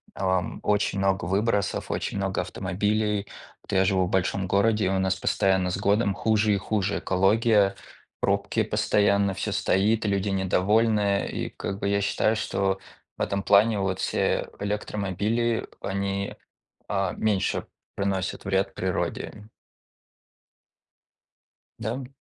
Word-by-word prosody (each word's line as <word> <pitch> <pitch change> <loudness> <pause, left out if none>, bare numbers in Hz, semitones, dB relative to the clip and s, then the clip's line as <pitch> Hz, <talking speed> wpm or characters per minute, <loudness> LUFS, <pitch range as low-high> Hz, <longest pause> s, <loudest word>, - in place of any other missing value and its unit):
ам, 95 -1 -1
очень 105 -1 +1
много 95 -2 +1
выбросов, 100 +2 0
очень - - -2
много 95 -1 -1
автомобилей. 105 +1 -1 0.4
Вот - - -10
я 95 0 +4
живу 95 -2 +2
в - - -4
большом 95 +1 0
городе, 105 +2 +2
и - - +2
у 95 0 +1
нас 95 0 +1
постоянно 95 0 +1
с 95 - -2
годом 100 +1 +2
хуже 110 0 +2
и - - +2
хуже 100 +1 -1
экология, 100 +1 +3 0.5
пробки - - +1
постоянно, 100 -1 +2
всё - - -3
стоит, 110 +4 +1
люди 100 0 0
недовольны, 100 +2 +2
и, - - -3
как 100 0 -5
бы, 100 - -1
я 100 0 +2
считаю, 110 +2 +1
что 95 -2 -1 0.4
в - - -7
этом 100 0 -1
плане 105 +1 +4
вот 95 -1 -1
все - - 0
электромобили, 105 +3 -1
они, 100 0 -2 0.5
а, 95 -3 0
меньше 105 -3 0 0.3
приносят 95 -2 -2
вред 95 0 0
природе. 105 0 -3 2.3
Да, 110 - -2
м? 130 -1 -7
100 Hz, 130 wpm, -26 LUFS, 95-105 Hz, 2.3 s, я